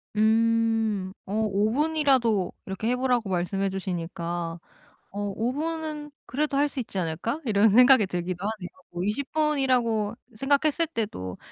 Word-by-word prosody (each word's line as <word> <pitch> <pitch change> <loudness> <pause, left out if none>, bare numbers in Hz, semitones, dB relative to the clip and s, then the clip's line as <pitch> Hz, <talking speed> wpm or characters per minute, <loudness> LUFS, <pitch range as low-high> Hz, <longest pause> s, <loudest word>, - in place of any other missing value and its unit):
음 225 -2 +2 0.2
어 195 - -5
5 205 +1 +1
분이라도 265 - +2
이렇게 190 +3 -4
해 250 - +2
보라고 250 -4 0
말씀해 190 +2 0
주시니까 175 -2 -4 0.5
어 200 - -8 0.2
'5 235 +3 0
분은 310 0 -4 0.2
그래도 290 +2 -1
할 290 +1 +3
수 285 - -9
있지 210 -5 -5
않을까?' 180 - -2
이런 215 -2 +4
생각이 250 0 +7
들기도 180 0 -4
하네요. 210 -4 -3 0.2
뭐 175 +1 -3
20 230 +7 -2
분이라고 255 -8 +1 0.2
생각했을 285 +5 +2
때도 205 - -4
225 Hz, 285 characters per minute, -26 LUFS, 195-270 Hz, 0.5 s, 생각이